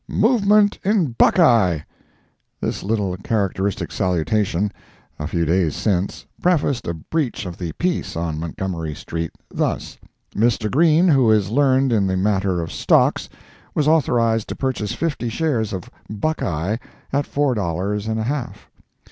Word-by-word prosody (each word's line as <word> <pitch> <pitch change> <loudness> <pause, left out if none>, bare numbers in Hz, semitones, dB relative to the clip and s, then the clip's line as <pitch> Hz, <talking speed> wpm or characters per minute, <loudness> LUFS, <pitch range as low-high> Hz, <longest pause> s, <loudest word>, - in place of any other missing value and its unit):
"Movement 210 -2 +3
in 195 - +2
'Buckeye.'" 115 - +4 0.8
This - - -3
little 100 -3 -1
characteristic 100 -1 -1
salutation, 95 +2 0 0.5
a 75 - -3
few 85 +1 0
days 85 -2 +1
since, 95 -3 -1 0.2
prefaced 150 -8 +1
a 85 - -2
breach 125 - -3
of 90 -2 -7
the 85 -3 -4
peace 180 0 -2
on 80 -2 -2
Montgomery 85 -1 -4
street, 85 +2 -4 0.2
thus: - - -2 0.4
Mr. 110 -1 +1
Green, 165 +4 +4
who 135 -8 +4
is 105 -2 +3
learned 135 -1 +3
in 100 -3 +2
the 95 0 0
matter 95 -2 +1
of 80 - -5
stocks, - - +2 0.5
was 150 - +1
authorized 115 -8 +2
to - - -4
purchase 130 -6 -2
fifty 145 -7 -2
shares 120 -5 -1
of 95 -3 -5 0.2
"Buckeye" 105 - -1 0.4
at 140 0 +1
four 145 -2 +1
dollars 100 +1 -2
and 110 0 -1
a - - -1
half. 130 +1 -4
110 Hz, 140 wpm, -21 LUFS, 90-140 Hz, 0.8 s, Buckeye